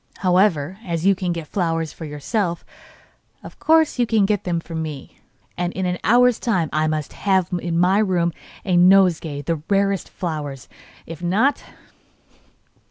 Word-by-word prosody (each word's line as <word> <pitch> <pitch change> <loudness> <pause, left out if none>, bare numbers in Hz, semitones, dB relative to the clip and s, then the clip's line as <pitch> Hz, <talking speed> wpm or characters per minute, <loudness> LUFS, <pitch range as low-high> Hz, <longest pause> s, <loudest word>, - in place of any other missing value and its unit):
However, 180 -2 +2
as 170 -3 -3
you 195 - +6
can 180 -2 -3
get 170 -2 -4
flowers 165 -2 -2
for 165 - -8
yourself, 170 - -3 0.8
of - - -12
course 320 -4 +3
you 240 - +2
can 220 -3 +3
get 205 -1 -1
them 175 -2 -1
for 165 0 -10
me, 155 -4 -6 0.4
and 175 0 -1
in 190 - -3
an 180 0 -2
hour's 245 +1 +4
time 180 -10 0
I 155 0 +1
must 155 -2 -3
have 190 -3 +1
in 170 -1 -2
my 185 +3 +3
room 180 -5 +1 0.3
a 185 - +1
nosegay 175 -5 +4
of - - -17
the 165 -1 -2
rarest 195 -2 +1
flowers. 150 -6 -5 0.4
If 165 0 -9
not 210 +11 +1
175 Hz, 165 wpm, -21 LUFS, 165-195 Hz, 0.8 s, you